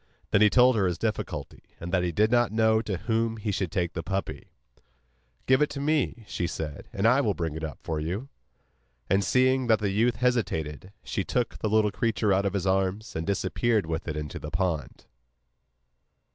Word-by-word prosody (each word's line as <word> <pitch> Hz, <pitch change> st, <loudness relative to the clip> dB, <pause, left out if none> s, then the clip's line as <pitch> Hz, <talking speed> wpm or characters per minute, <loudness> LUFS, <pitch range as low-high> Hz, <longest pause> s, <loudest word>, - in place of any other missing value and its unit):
Then 100 Hz, -, +4 dB
he 105 Hz, -, +7 dB
told 125 Hz, +2 st, +5 dB
her 100 Hz, -4 st, +2 dB
his 90 Hz, -, -1 dB
difficulty, 95 Hz, -9 st, -4 dB, 0.2 s
and 85 Hz, +1 st, -6 dB
that 90 Hz, -, +2 dB
he 90 Hz, -1 st, -1 dB
did 105 Hz, +6 st, +2 dB
not 120 Hz, -3 st, +3 dB
know 110 Hz, 0 st, +3 dB
to 105 Hz, -5 st, -3 dB
whom 115 Hz, +3 st, -1 dB
he 105 Hz, -1 st, -2 dB
should 95 Hz, -4 st, -2 dB
take 85 Hz, -1 st, -1 dB
the 85 Hz, -, -3 dB
puppy. 95 Hz, 0 st, -4 dB, 1.0 s
'Give 130 Hz, +2 st, +4 dB
it 150 Hz, -, +3 dB
to 140 Hz, -, -6 dB
me,' 140 Hz, -6 st, 0 dB
she 85 Hz, -, -2 dB
said, 75 Hz, -3 st, -6 dB
'and 100 Hz, +3 st, +1 dB
I 125 Hz, +4 st, +5 dB
will 105 Hz, -7 st, 0 dB
bring 85 Hz, -3 st, -2 dB
it 80 Hz, +1 st, -6 dB
up 75 Hz, -5 st, -5 dB
for 80 Hz, -1 st, -2 dB
you.' 90 Hz, -, -3 dB, 0.8 s
And, 100 Hz, +1 st, +3 dB
seeing 130 Hz, +1 st, +2 dB
that 110 Hz, -1 st, +5 dB
the 105 Hz, -2 st, -1 dB
youth 115 Hz, +4 st, +2 dB
hesitated, 95 Hz, -, -1 dB
she 95 Hz, -, -2 dB
took 120 Hz, +4 st, -2 dB
the 110 Hz, -, -1 dB
little 110 Hz, -1 st, +3 dB
creature 110 Hz, -1 st, +1 dB
out 100 Hz, +1 st, +2 dB
of 100 Hz, -, -2 dB
his 100 Hz, -2 st, -1 dB
arms, 95 Hz, +4 st, 0 dB
and 80 Hz, +2 st, -3 dB
disappeared 100 Hz, +2 st, +1 dB
with 80 Hz, +2 st, -4 dB
it 80 Hz, -1 st, -3 dB
into 75 Hz, -1 st, -5 dB
the -, -, -6 dB
pond. 85 Hz, -6 st, -2 dB
100 Hz, 200 wpm, -27 LUFS, 90-115 Hz, 1.0 s, he